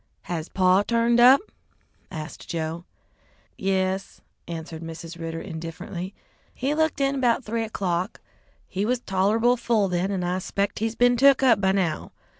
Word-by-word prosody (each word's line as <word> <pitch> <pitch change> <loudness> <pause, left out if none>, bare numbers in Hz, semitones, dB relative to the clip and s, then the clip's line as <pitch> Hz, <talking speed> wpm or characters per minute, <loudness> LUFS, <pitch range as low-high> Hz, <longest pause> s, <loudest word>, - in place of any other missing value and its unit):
"Has 165 -2 -4
paw 185 0 +4
turned 235 +2 +2
up?" 255 +5 +8 0.7
asked 155 -1 -8
Joe. 165 +1 -3 0.7
"Yes," 190 0 -1 0.3
answered 165 -1 -6
Mrs. 165 +1 -8
Ridder 165 0 -4
indifferently. 170 +2 -6 0.4
"He 270 +3 -1
looked 315 -1 +1
in 275 -1 +1
'bout 245 +1 +2
three 230 +1 -2
o'clock. 185 -5 -2 0.5
He 190 - -2
was 245 +3 +1
tolerable 220 +6 +2
full 225 -4 +1
then, 180 +2 0
and 190 -3 -1
I 180 +1 -1
'spec 200 +2 -2
he's 225 +1 -1
been 245 0 +4
took 275 +1 +5
up 230 -6 +5
by 190 -1 +3
now. 185 -5 -1
195 Hz, 150 wpm, -25 LUFS, 175-235 Hz, 0.7 s, up